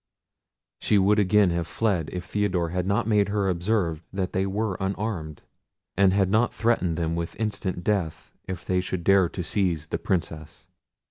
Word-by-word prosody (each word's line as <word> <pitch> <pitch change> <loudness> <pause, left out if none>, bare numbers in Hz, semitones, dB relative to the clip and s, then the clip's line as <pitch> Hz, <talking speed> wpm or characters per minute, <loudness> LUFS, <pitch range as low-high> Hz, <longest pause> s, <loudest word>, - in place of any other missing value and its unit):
She 105 - +2
would 100 +2 +4
again 100 -1 +4
have 85 -1 -2
fled 95 -6 0
if 90 -1 -5
Theodore 90 -3 0
had 90 +2 -2
not 100 0 +1
made 105 -2 +2
her 100 -1 0
observe 90 -3 0
that 95 -1 -3
they 95 +1 0
were 105 +1 -1
unarmed, 95 -6 -3 0.5
and 95 0 +4
had 95 -1 +2
not 110 +3 +3
threatened 100 -8 0
them 85 -1 -1
with 85 0 -4
instant 100 -5 -2
death 95 -7 -2
if 95 -1 -6
they 90 -1 +1
should 90 -1 -4
dare 95 -1 +4
to 90 - -5
seize 85 -5 0
the - - -3
Princess. 80 -4 -3
95 Hz, 175 wpm, -25 LUFS, 85-105 Hz, 0.5 s, would